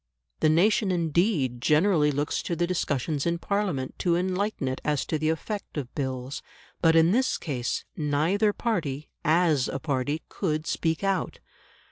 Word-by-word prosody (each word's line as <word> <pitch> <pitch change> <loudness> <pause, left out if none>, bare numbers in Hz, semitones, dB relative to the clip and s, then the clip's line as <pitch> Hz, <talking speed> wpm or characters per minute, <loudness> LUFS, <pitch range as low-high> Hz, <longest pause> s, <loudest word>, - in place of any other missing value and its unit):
The 155 - +3
nation 195 +5 +3
indeed 165 - +1
generally 155 +1 +3
looks 145 +1 -1
to 170 - -3
the 175 - +1
discussions 150 -4 -1
in 170 0 +1
Parliament 185 -9 -2
to 175 -2 +2
enlighten 185 -2 -1
it 130 0 -3
as 150 -2 0
to 155 - -1
the 155 +1 +1
effect 195 +4 -4
of 130 -4 -4
Bills. 130 0 -4 0.4
But 165 -1 +5
in 165 +1 +5
this 255 +5 +2
case 125 -6 -3
neither 160 +8 +1
party, 160 - -2
as 160 -4 +3
a - - -3
party, 145 +1 -2
could 155 -5 -2
speak 165 +1 -1
out. 195 -1 0
160 Hz, 155 wpm, -26 LUFS, 145-180 Hz, 0.4 s, But